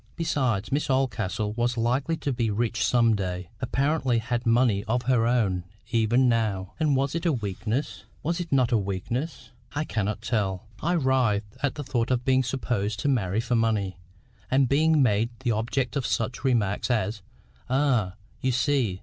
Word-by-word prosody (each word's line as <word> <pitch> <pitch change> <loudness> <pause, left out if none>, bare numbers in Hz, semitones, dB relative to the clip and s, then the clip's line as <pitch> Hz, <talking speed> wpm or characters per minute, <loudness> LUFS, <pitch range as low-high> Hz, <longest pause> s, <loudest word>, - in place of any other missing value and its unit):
Besides, 130 - 0
Miss 145 +1 0
Oldcastle 110 -5 0
was 120 +2 0
likely 130 +8 0
to 140 - -2
be 120 -2 0
rich 115 +2 0
some 115 -2 +4
day—apparently 120 - -1
had 120 +1 -2
money 115 -4 +3
of 120 +3 0
her 120 -2 +2
own 105 -7 +1 0.3
even 120 +2 +3
now; 105 -5 0
and 150 -3 +2
was 135 +1 0
it 165 - -2
a 170 - +3
weakness? 110 +2 -3 0.2
was 170 +4 -1
it 175 -1 -5
not 130 -3 +3
a 115 - +4
weakness?—I 120 - -4
cannot 110 -5 -2
tell—I 110 - -2
writhed 125 - +1
at 145 -2 0
the 145 - -4
thought 125 -3 -1
of 125 -1 0
being 130 0 +4
supposed 115 -5 -2
to 145 - +1
marry 105 -6 +1
for 120 +1 -2
money, 105 -5 0 0.5
and 135 0 +3
being 155 +2 +4
made 110 -1 +2
the 125 -3 +1
object 120 +5 -1
of 135 -6 0
such 110 +5 -2
remarks 115 -7 +1
as, 110 -3 0 0.5
"Ah! 125 -8 +1 0.3
you 130 - +1
see! 125 -6 +1
120 Hz, 165 wpm, -26 LUFS, 105-130 Hz, 0.5 s, some